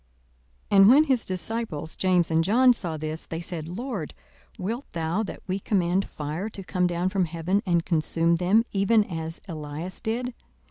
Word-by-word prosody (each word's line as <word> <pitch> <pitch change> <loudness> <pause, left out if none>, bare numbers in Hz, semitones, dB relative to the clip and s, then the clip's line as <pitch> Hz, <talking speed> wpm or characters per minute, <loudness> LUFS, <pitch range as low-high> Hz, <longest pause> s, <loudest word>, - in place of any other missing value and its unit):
42:009:054 200 - +6
And 195 - +8
when 280 +5 +7
his 265 -6 +1
disciples 185 -4 -3
James 180 -3 +2
and 160 0 +3
John 245 +7 +5
saw 170 -8 -2
this, 155 +1 -4
they 165 - -4
said, 170 -2 -5
Lord, 200 - -5 0.4
wilt 230 +8 -4
thou 165 +4 -1
that 215 - -6
we 190 +1 -2
command 190 -1 0
fire 155 +8 -4
to 200 -2 -8
come 180 -1 0
down 175 +1 0
from 190 -2 +1
heaven, 170 +5 -1
and 170 -2 +2
consume 165 0 +1
them, 190 +6 +3
even 210 +2 +3
as 165 -4 -6
Elias 155 +1 -6
did? 245 +3 -2
180 Hz, 175 wpm, -26 LUFS, 165-210 Hz, 0.4 s, And